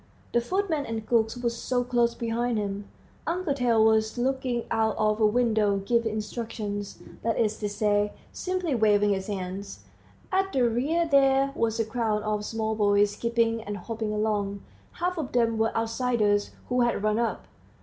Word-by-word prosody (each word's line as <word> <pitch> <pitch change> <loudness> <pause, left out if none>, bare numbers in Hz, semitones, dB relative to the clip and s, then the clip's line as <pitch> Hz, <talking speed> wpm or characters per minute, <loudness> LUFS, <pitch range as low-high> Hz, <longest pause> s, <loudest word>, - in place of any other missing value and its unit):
The 240 - +3
footmen 335 0 -1
and 225 -1 -4
cooks 225 0 +1
were 245 +1 -1
close 240 -1 +1
behind 235 0 -1
him; 200 -1 -3 0.4
Uncle 340 -3 0
Tail 235 -5 +3
was 220 +1 +2
looking 255 -1 0
out 220 -1 +1
of 215 +1 +1
a 215 - +6
window, 215 -3 +2
giving 225 +3 +1
instructions, 215 -2 -4 0.2
that 230 0 0
is 215 -2 +1
to 210 - -2
say, 205 0 +1 0.2
simply 365 -4 -2
waving 210 -3 +3
his 190 -1 -1
hands. 195 0 -5 0.5
At 385 0 +1
the 250 -3 +3
rear 295 +9 +1
there 275 -1 +4
was 230 -2 -1
a 225 - +2
crowd 220 -2 -1
of 210 -1 -1
small 220 0 -2
boys 205 -1 +3
skipping 230 +1 0
and 205 -1 -5
hopping 220 +2 -4
along; 205 -2 -1 0.3
half 355 0 -2
of 295 - -4
them 230 -2 +2
were 225 0 +2
outsiders 225 -3 +1 0.2
who 250 0 +2
had 240 -4 +1
run 215 +1 +2
up. 235 - -1
225 Hz, 165 wpm, -27 LUFS, 210-245 Hz, 0.5 s, a